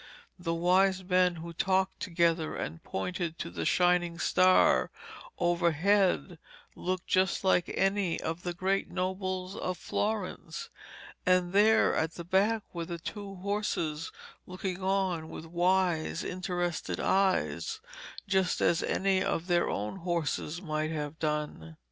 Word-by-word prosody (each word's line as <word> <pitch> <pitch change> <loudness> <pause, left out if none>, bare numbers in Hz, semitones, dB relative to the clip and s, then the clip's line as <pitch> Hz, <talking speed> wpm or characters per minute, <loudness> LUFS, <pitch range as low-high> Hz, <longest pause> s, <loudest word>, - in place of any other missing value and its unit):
The 165 -1 -1
wise 185 +2 +3
men 180 -1 +3
who 170 +1 -7
talked 190 +2 +1
together 170 -3 +1
and 80 +1 -5
pointed 170 - -3
to - - -5
the 85 -2 -4
shining 175 -1 +2
star 185 +1 +4 0.5
overhead 175 +1 +2 0.4
looked 185 0 -3
just 190 +1 +1
like 185 -2 +3
any 195 -3 +1
of 165 +2 -4
the 175 -1 -4
great 190 +2 0
nobles 185 0 -3
of 185 -1 -3
Florence. 205 +2 -3 0.5
And 180 -1 +2
there 215 +2 +5
at 160 +1 -1
the 170 - -6
back 200 +5 +2
were 170 -1 -3
the 170 0 -5
two 195 +3 -7
horses 180 -5 -2 0.4
looking 185 0 -4
on 185 -4 0
with 160 - -8
wise 175 -1 +1
interested 175 -1 -2
eyes, 195 - +1 0.5
just 190 -2 +1
as 170 - +3
any 190 -1 +1
of 175 -4 -1
their 175 -1 +2
own 105 - -3
horses 170 -1 -2
might 155 -2 -1
have 150 -1 -4
done. 150 - -3
180 Hz, 130 wpm, -30 LUFS, 165-190 Hz, 0.5 s, there